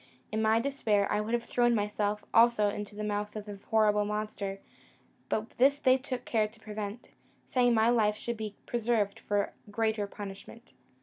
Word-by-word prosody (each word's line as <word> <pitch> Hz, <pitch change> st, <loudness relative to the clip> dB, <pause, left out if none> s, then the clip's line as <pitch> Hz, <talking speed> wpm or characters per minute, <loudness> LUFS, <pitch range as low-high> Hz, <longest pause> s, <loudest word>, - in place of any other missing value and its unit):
In 220 Hz, +1 st, 0 dB
my 220 Hz, +1 st, +4 dB
despair, 230 Hz, -6 st, +1 dB
I 210 Hz, -, +2 dB
would 225 Hz, +3 st, 0 dB
have 235 Hz, -, -2 dB
thrown 240 Hz, 0 st, +2 dB
myself 210 Hz, 0 st, -1 dB
also 230 Hz, -3 st, +5 dB
into 205 Hz, 0 st, -6 dB
the 210 Hz, -, -4 dB
mouth 210 Hz, 0 st, -2 dB
of 210 Hz, -1 st, -5 dB
the 205 Hz, -2 st, -8 dB
horrible 210 Hz, -1 st, +4 dB
monster; 210 Hz, -2 st, -3 dB, 0.7 s
but 215 Hz, +1 st, -1 dB
this 275 Hz, +3 st, +5 dB
they 260 Hz, -2 st, +4 dB
took 255 Hz, -2 st, -5 dB
care 220 Hz, -2 st, +1 dB
to 215 Hz, +1 st, -18 dB
prevent, 215 Hz, +1 st, -6 dB, 0.4 s
saying, 245 Hz, -2 st, +3 dB
my 225 Hz, +2 st, +4 dB
life 215 Hz, -3 st, +3 dB
should 235 Hz, +2 st, -4 dB
be 215 Hz, -2 st, -5 dB
preserved 225 Hz, -4 st, 0 dB
for 205 Hz, -1 st, -1 dB, 0.2 s
greater 220 Hz, -1 st, 0 dB
punishment. 205 Hz, +4 st, -10 dB
215 Hz, 175 wpm, -30 LUFS, 210-235 Hz, 0.7 s, also